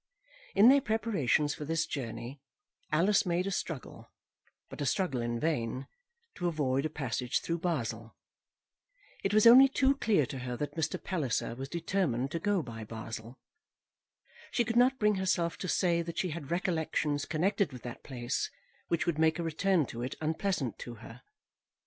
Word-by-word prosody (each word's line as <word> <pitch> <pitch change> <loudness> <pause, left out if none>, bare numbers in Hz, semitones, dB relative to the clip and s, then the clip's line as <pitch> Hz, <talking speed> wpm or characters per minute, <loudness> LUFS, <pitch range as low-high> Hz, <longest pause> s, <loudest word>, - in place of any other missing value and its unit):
In 215 +5 +8
their 280 +1 +6
preparations 200 - +1
for - - -7
this 165 +2 0
journey, 130 0 -6 0.5
Alice 185 +6 +4
made 180 0 0
a 195 - -2
struggle, 165 -6 -5 0.6
but - - -9
a - - 0
struggle 135 -6 0
in 120 0 -2
vain, 130 -4 -1 0.5
to 175 - -2
avoid 145 -3 0
a - - -11
passage 125 -4 -1
through 170 0 -3
Basle. 115 -10 -3 1.1
It 195 - +1
was 215 +1 +4
only 255 +4 +10
too 270 0 +2
clear 205 - +3
to 135 +1 -6
her 125 -1 -4
that 145 - -3
Mr. 160 -1 -1
Palliser 150 - -1
was 135 +3 -6
determined 165 -7 -1
to 165 - -2
go 200 -1 +1
by 115 -3 -7
Basle. 115 +2 -7 1.1
She 240 - +1
could 230 - -2
not 255 +2 +5
bring 210 -3 +2
herself 180 -3 0
to 185 - -4
say 170 -1 +2
that 170 0 -6
she 185 - 0
had 150 -3 -6
recollections 160 -4 0
connected 185 +4 +1
with 125 -3 -10
that 120 -1 -7
place 130 - -3 0.4
which 170 - 0
would 170 -3 0
make 160 +1 +3
a 170 - -2
return 165 +1 +2
to 120 -1 -7
it 125 - -3
unpleasant 160 - -1
to 120 - -7
her. 115 +2 -12
160 Hz, 170 wpm, -31 LUFS, 130-190 Hz, 1.1 s, only